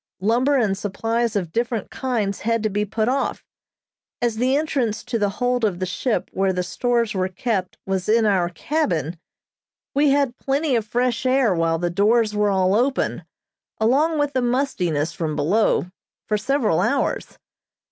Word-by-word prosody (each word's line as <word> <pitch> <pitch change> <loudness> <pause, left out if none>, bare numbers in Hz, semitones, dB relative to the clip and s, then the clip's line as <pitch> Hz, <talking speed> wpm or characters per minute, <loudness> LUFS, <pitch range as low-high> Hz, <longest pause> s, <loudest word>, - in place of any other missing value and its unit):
Lumber 245 +8 +2
and 215 -6 +1
supplies 225 +3 -1
of 180 -5 -2
different 230 0 -2
kinds 225 -7 -2
had 230 0 0
to 215 - 0
be 205 +1 0
put 220 +2 -1
off. 270 +2 -1 0.7
As 235 -3 0
the 255 +3 +2
entrance 265 -8 -1
to 245 -2 -2
the 205 -1 +2
hold 245 -1 0
of 200 -5 +1
the 185 - -2
ship 220 +6 -2
where 195 0 +1
the 180 -1 -1
stores 235 +2 0
were 185 -1 0
kept 190 0 -3
was 190 0 -2
in 225 0 +4
our 185 -4 +2
cabin, 170 - -2 0.7
we 285 +1 +3
had 275 -3 +1
plenty 275 0 0
of 220 -2 -1
fresh 245 +1 0
air 255 -5 +3
while 165 -1 +1
the 175 +1 -1
doors 210 +4 +2
were 210 0 +2
all 190 -1 +2
open, 255 +5 0 0.5
along 285 +9 +2
with 290 -1 0
the 260 - +1
mustiness 220 - 0
from 155 -3 -3
below, 190 +10 +2 0.4
for 215 - 0
several 245 +3 +1
hours. - - -1
225 Hz, 165 wpm, -22 LUFS, 190-250 Hz, 0.7 s, in